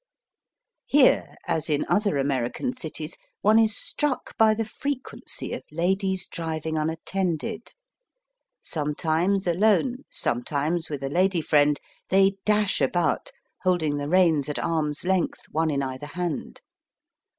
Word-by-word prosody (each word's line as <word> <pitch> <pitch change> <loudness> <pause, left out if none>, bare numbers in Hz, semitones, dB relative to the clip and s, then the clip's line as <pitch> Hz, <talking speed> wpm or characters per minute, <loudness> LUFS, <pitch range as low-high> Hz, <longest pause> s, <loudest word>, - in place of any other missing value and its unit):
Here, 280 -2 +4
as 160 -3 -1
in 150 -1 +1
other 205 -7 +2
American 135 - -1
cities, 160 -6 -5 0.3
one 215 +2 +5
is 220 -2 +4
struck 295 -3 -1
by 220 -1 +5
the 225 +1 -1
frequency 275 +4 -4
of - - -4
ladies 190 +3 0
driving 160 -1 -4
unattended. 170 +6 -2 0.9
Sometimes 160 +5 0
alone, 220 +9 +2
sometimes 150 +7 -1
with 145 -3 -4
a 135 - -1
lady 180 +2 +2
friend, 145 -1 +3 0.3
they 195 +1 +4
dash 210 -4 +2
about, 175 - +1 0.3
holding 165 -6 +1
the 145 0 -3
reins 165 -6 +3
at 150 - -2
arm's 155 -2 -1
length, 185 -2 0
one 160 +1 +1
in 140 -2 0
either 130 +2 -5
hand. 170 0 -4
170 Hz, 125 wpm, -25 LUFS, 150-195 Hz, 0.9 s, one